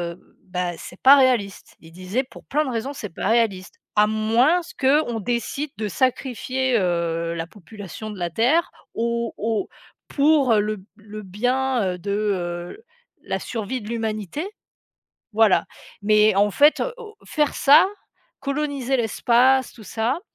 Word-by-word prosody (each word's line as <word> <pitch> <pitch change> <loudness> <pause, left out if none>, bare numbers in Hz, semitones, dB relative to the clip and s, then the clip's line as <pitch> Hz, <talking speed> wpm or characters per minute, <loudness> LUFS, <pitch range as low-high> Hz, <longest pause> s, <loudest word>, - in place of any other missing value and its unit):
heu, - - -26
bah, 180 -1 -2
c'est 180 - -11
pas 270 +2 +9
réaliste, 245 -8 +1
il 165 - -16
disait: 185 +9 -2
«Pour - - -13
plein 305 +2 0
de 260 - -3
raisons, 240 +3 -3
c'est 210 -10 -7
pas - - -3
réaliste, 220 -5 +1 0.2
à 210 0 +5
moins 225 +10 +2 0.2
qu'on 265 -4 +2
décide 245 +6 -2
de 215 - -2
sacrifier, 255 +2 0
heu, 170 -2 -1
la 165 0 -3
population 205 +2 -10
de 210 - -9
la 175 -1 -1
Terre 260 - +2 0.2
au 235 0 -1
au 220 0 -2 0.4
pour 280 -4 +3
le 210 0 0
b 190 - -16
le 210 0 -10
bien, 250 +5 0
heu, - - -9
de, 200 +3 -4
heu, 190 - -3 0.4
la - - -2
survie 230 +2 -4
de 210 - -9
l'humanité», 225 - -3 0.9
voilà, 220 -3 +4 0.4
mais 210 0 +4
en 205 +1 +3
fait, 295 +9 +4 0.2
o 440 -3 -10
faire 300 -2 0
ça, 300 +6 +6 0.5
coloniser 275 -2 -1
l'espace, 250 +3 +2
tout 220 - -14
ça, 230 - -1
225 Hz, 150 wpm, -23 LUFS, 205-265 Hz, 0.9 s, pas